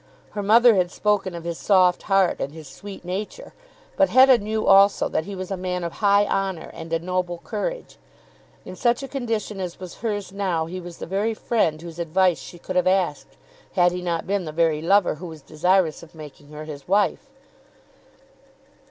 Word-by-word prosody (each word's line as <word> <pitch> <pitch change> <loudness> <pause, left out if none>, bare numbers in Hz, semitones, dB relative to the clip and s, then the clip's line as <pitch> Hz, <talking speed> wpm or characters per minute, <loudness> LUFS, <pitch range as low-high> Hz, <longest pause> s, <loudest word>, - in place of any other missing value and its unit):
Her 205 - -4
mother 230 +4 +6
had 180 -3 +1
spoken 200 -2 0
of 170 - -7
his 170 -1 -5
soft 185 -3 +3
heart, 195 -2 +3
and 140 - -3
his 160 -3 -10
sweet 195 +5 -10
nature. 205 - -6 0.4
But 290 -1 +3
Hetta 260 -1 +6
knew 215 +1 -2
also 195 +1 +5
that 160 - -2
he 200 0 -6
was 185 0 -6
a - - 0
man 180 -1 -3
of 170 - -3
high 200 0 +4
honour 195 -4 -2
and 165 0 -9
a 165 - +2
noble 180 0 -2
courage. 485 - -5 0.7
In 185 - -8
such 240 +6 +1
a - - -5
condition 225 -6 -3
as 180 -2 -5
was 185 -2 -9
hers 205 -4 -3
now 185 -5 -1
he 180 +3 -6
was 175 -1 -10
the - - -6
very 205 +5 -1
friend 190 -10 0
whose 170 -1 -9
advice 175 +1 +2
she 175 - -11
could 185 +2 -7
have 180 - +2
asked, 185 -5 0 0.4
had 175 -2 +4
he 180 0 -4
not 170 -2 -2
been 195 -2 -1
the 155 - -5
very 160 -1 +1
lover 195 +3 +3
who 180 - -6
was 160 -3 -11
desirous 175 +1 +1
of 170 0 -15
making 145 -2 -12
her 150 0 -8
his 145 -3 -9
wife. 205 +8 +1
185 Hz, 195 wpm, -23 LUFS, 170-205 Hz, 0.7 s, mother